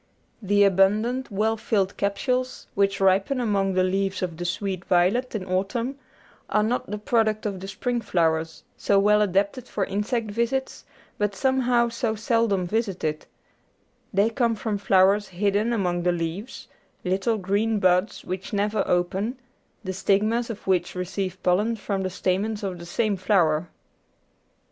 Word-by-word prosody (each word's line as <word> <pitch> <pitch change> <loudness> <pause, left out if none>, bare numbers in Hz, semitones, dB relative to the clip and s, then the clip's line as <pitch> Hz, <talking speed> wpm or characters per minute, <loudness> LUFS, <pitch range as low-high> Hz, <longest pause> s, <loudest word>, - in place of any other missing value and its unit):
The 205 0 +3
abundant 210 +7 +2
well 215 +3 +1
filled 200 -3 0
capsules 250 +6 -1
which 200 0 +1
ripen 195 +7 +2
among 200 -5 +1
the 185 - +3
leaves 190 0 -1
of 175 -3 -3
the 175 - -4
sweet 185 +1 -3
violet 195 +9 +2
in 195 -3 -3
autumn 230 +9 -2 0.5
are 210 - +2
not 235 0 -1
the 210 - -3
product 215 0 +1
of 200 -3 -2
the 190 - -7
spring 240 +4 -2
flowers, 165 -5 0
so 200 - +2
well 210 +1 +4
adapted 205 +5 0
for 200 - -1
insect 210 +3 -2
visits 235 +5 -2 0.3
but 205 -1 0
somehow 250 -1 +2
so 230 -1 -2
seldom 220 -4 +1
visited; 185 -7 -2 0.8
they 205 +3 +2
come 230 -1 +1
from 210 -1 -3
flowers 195 +1 +4
hidden 205 +4 0
among 180 -6 0
the 180 0 +2
leaves, 175 +7 -5 0.4
little 195 +5 0
green 205 +3 0
buds 185 +1 +1
which 185 +2 -5
never 205 0 +1
open, 190 +7 0 0.5
the 190 -2 -3
stigmas 210 +5 +1
of 220 -3 -7
which 180 -2 0
receive 185 0 -3
pollen 205 +6 +2
from 200 -2 -3
the 190 - -1
stamens 200 +4 -1
of 185 -3 -4
the 170 - -9
same 210 +3 0
flower. 175 -4 +2
200 Hz, 150 wpm, -25 LUFS, 185-225 Hz, 0.8 s, well